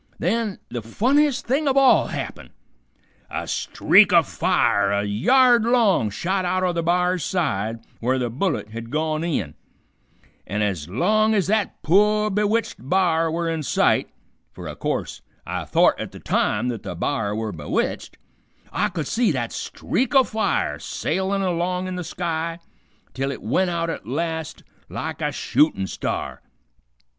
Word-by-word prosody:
Then 215 +2 -1
the 120 -1 -4
funniest 260 - +1
thing 280 +5 0
of 270 0 +2
all 270 -1 +5
happened. - - -6 0.8
A - - -4
streak 205 0 +4
o' 170 -2 +6
fire - - +1
a 100 0 +1
yard 240 - +4
long 225 - +3
shot 185 - -1
out 185 +1 0
o' 180 -1 +1
the 170 - -1
b'ar's 180 0 +1
side 115 - -1 0.2
where 130 +3 +1
the 120 -2 -2
bullet 135 - -2
had 115 +1 -7
gone 155 +2 -1
in, 120 - -2 0.9
an' 105 +2 -1
ez 90 -7 -2
long 215 - +2
ez 195 -4 +2
that 210 +1 -1
poor 210 +5 +3
bewitched 210 +3 0
b'ar 165 -3 +2
were 165 +1 -2
in 165 -1 -1
sight 140 - +2 0.4
fer - - -9
o' - - -6
course - - -3 0.2
I - - -4
thort - - +3
at - - -5
the - - -10
time 125 - 0
th't 120 -4 -3
the 90 - -6
b'ar 105 - -1
were 110 -1 -3
bewitched 75 -5 -3 0.6
I 210 - +1
could 170 -6 -4
see 230 - +1
that - - -2
streak 265 +2 -2
o' 265 - +8
fire 220 -2 -1
sailin' 195 +1 -2
along 180 0 -1
in 185 0 -4
the 180 - -4
sky 165 -1 -3 0.6
till 135 +1 -2
it - - -8
went 180 - +1
out 170 -1 -1
at 110 - -7
last 160 +3 -3 0.3
like - - -5
a - - 0
shootin' 105 -11 +1
star. - - -4
170 Hz, 160 wpm, -23 LUFS, 130-205 Hz, 0.9 s, o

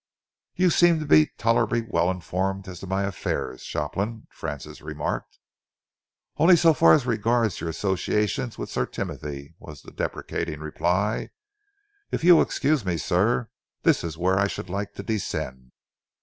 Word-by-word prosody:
"You 185 -1 +3
seem 175 -1 +5
to 155 - -4
be 80 - +6
tolerably 115 0 +1
well 85 -4 +1
informed 95 +1 -2
as 90 -2 -8
to 95 - -8
my 95 +1 0
affairs, 90 -8 -3
Shopland," 100 +9 -3
Francis 70 -1 -7
remarked. - - -4 1.0
"Only 175 +3 +7
so 165 -1 +5
far 85 - +6
as 125 - +3
regards 115 -2 +1
your 85 - -2
associations 105 +6 -1
with - - -6
Sir - - -1
Timothy," 70 +1 -6
was 75 -3 -11
the - - -12
deprecating 75 - -4
reply. 90 +7 -1 0.8
"If - - -3
you 175 0 +8
will - - +6
excuse 145 -2 +1
me, 90 -3 -1
sir, 65 -4 +1 0.3
this - - +3
is 80 -2 -5
where 95 +2 +2
I 100 - +3
should 95 -2 -6
like 100 +1 -3
to - - -6
descend." 65 - -4
95 Hz, 155 wpm, -25 LUFS, 85-115 Hz, 1.0 s, you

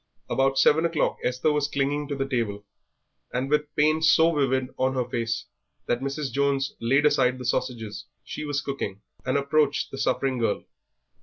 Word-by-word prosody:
About 135 0 +2
seven 150 +4 +5
o'clock 165 -2 0
Esther 125 +5 +1
was 150 -1 +1
clinging 145 +1 -1
to 140 - -3
the 135 0 -2
table, 110 -6 -2 0.7
and 130 +3 -2
with 150 0 +2
pain 155 +1 +3
so 160 +1 +5
vivid 130 -3 0
on 130 +1 0
her 125 -2 -1
face 115 0 -2 0.4
that 120 +1 0
Mrs. 140 0 -3
Jones 140 +1 0
laid 135 +5 +3
aside 130 -4 +3
the 125 - -7
sausages 115 -3 -2 0.2
she - - -6
was 145 -2 -1
cooking 105 -8 -5 0.2
and 130 - +2
approached 140 +1 +1
the 135 - -6
suffering 135 -2 0
girl. 110 -3 0
135 Hz, 170 wpm, -26 LUFS, 125-145 Hz, 0.7 s, seven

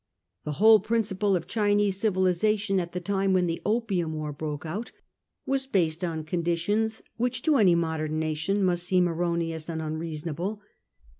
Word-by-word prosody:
The 150 - -2
whole 220 +6 +7
principle 210 -2 0
of 170 -2 -2
Chinese 205 -1 +1
civilisation, 195 0 +1
at 175 -1 -4
the 180 - -2
time 195 +1 0
when 185 -1 +3
the 165 -1 -2
Opium 200 -8 0
War 150 -1 -4
broke 150 0 -5
out, 200 +9 -4 0.5
was 270 0 -1
based 175 -7 0
on 160 -3 -2
conditions 175 +7 -1
which 245 +1 -1
to 305 -3 +4
any 190 -7 +5
modern 160 -2 -1
nation 160 +6 0
must 175 -2 +1
seem 180 -1 +3
erroneous 170 -1 -2
and 160 -1 -3
unreasonable. 160 +5 -4
180 Hz, 155 wpm, -27 LUFS, 160-205 Hz, 0.5 s, whole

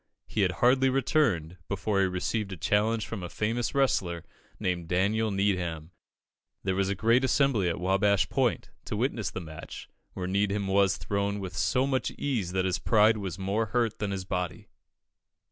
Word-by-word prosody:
He 110 - -2
had 90 -2 +2
hardly 130 +8 +4
returned, 120 - +1
before 100 0 0
he 95 - +3
received 95 +3 -2
a 95 - -5
challenge 105 +7 +1
from 110 -4 -6
a 90 - -5
famous 115 +8 -2
wrestler, 90 - +1 0.3
named 90 -2 -2
Daniel 100 +5 +1
Needham. 90 -5 -1 0.7
There 95 - 0
was 95 +1 0
a 100 - 0
great 115 +6 +3
assembly 130 -8 +2
at 85 - -3
Wabash 95 +1 +2
Point, - - 0
to - - -3
witness - - -1
the - - -5
match, 80 -1 -9 0.2
where 90 - -4
Needham 100 +2 0
was 95 0 +3
thrown 100 0 -2
with 95 -2 -6
so 130 +1 +1
much 135 -1 0
ease 115 -11 -1
that 95 -1 +1
his 95 - 0
pride 110 0 +4
was 95 -5 -5
more 100 +4 -1
hurt 115 -2 0
than 105 -2 -1
his 95 -1 -4
body. 90 -3 -4
100 Hz, 175 wpm, -28 LUFS, 90-110 Hz, 0.7 s, hardly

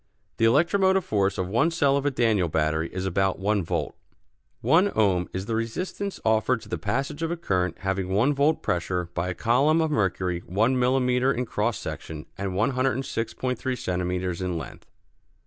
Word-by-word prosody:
The 115 - +3
electromotive 190 - +3
force 100 -2 +1
of 95 - -1
one 115 - +2
cell 145 -5 +2
of 140 0 0
a - - +2
Daniell 110 -9 +2
battery 80 +1 0
is 95 +1 -4
about 95 0 +1
one 100 0 0
volt. - - -2 0.7
One 185 +5 +4
ohm 95 -5 +2
is 95 +1 -4
the 115 - -3
resistance 180 - -3
offered 110 +2 +2
to - - -13
the 90 - -3
passage 140 - -2
of 165 - -1
a 170 - -2
current 90 - -1
having 95 -1 -1
one 115 +10 +2
volt 145 +3 +1
pressure 90 0 -1
by 85 +1 -2
a 90 - -3
column 135 - +3
of 160 -1 +1
mercury 95 - 0
one 110 +8 +2
millimeter 125 +1 +2
in 125 -1 -1
cross 110 0 -1
section 75 -1 -7
and 95 0 -3
106.3 130 +2 -1
centimeters 90 -1 -2
in 90 -2 -2
length. 80 - -9
110 Hz, 175 wpm, -25 LUFS, 90-135 Hz, 0.7 s, One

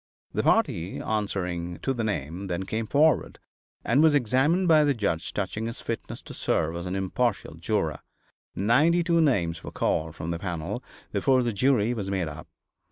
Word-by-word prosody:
The - - +1
party 85 +3 +1
answering 90 -5 -2
to 135 - +1
the 120 -3 -2
name 95 -2 -3
then 90 +1 -2
came 110 +3 -3
forward 150 +2 +3 0.5
and 140 - +4
was 155 -2 +5
examined 145 - +2
by 155 -2 +6
the 145 -2 +2
judge 100 -7 -1
touching 105 +3 -3
his 115 - -6
fitness 115 - -5
to - - -9
serve 80 +1 0
as 85 +1 -5
an 90 - -3
impartial 95 -1 -1
juror. - - -1 0.6
Ninety 145 - +3
two 170 -1 +3
names 85 - +1
were - - -6
called 80 0 -1
from 80 +1 -4
the 85 - -3
panel 85 -3 -4 0.3
before 130 -2 +3
the 120 -2 -1
jury 120 0 +2
was 100 -5 -4
made 95 -4 -1
up. 75 0 -8
105 Hz, 175 wpm, -26 LUFS, 85-135 Hz, 0.6 s, by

